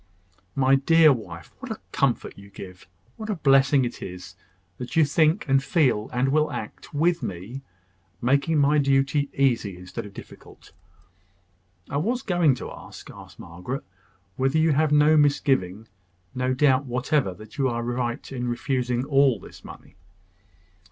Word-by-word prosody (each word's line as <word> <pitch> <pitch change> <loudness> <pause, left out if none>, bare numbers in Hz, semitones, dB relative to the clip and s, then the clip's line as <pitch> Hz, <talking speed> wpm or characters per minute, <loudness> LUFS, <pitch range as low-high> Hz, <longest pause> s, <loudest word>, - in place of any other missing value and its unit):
"My 135 0 +3
dear 155 +2 +5
wife, 85 -9 -9
what - - -6
comfort - - -1
you 100 0 -14
give! 90 -2 -11 0.3
What 220 0 -7
a 210 - 0
blessing 135 -3 +4
it 120 - -6
is, 90 0 -9 0.4
that 125 - -6
you 160 -2 +5
think, 155 +5 +1
and 135 0 +3
feel, 130 - +1
and 125 +2 0
will 155 +2 +2
act, - - -7
with 170 +3 +1
me 95 +9 -6 0.6
making 140 +6 +1
my 145 +1 +3
duty 140 +1 +1
easy 120 -8 0
instead 90 +3 -7
of 100 - -16
difficult!" - - -14 1.2
"I 140 - -3
was 235 - -1
going 175 - +2
to - - -8
ask," - - -11
observed - - -14
Margaret, 90 +11 -7 0.5
"whether 135 +3 +1
you 160 0 +3
have 150 +1 +2
no 150 +1 +5
misgiving 130 -9 +1 0.5
no 130 0 -1
doubt 135 0 +3
whatever 125 -4 -1
that 110 +6 -13
you 135 -1 +2
are 120 -1 -3
right 120 +2 -3
in 125 -2 -4
refusing 125 0 -1
all 135 -5 +3
this - - -14
money." 95 - -13
135 Hz, 150 wpm, -24 LUFS, 120-150 Hz, 1.2 s, dear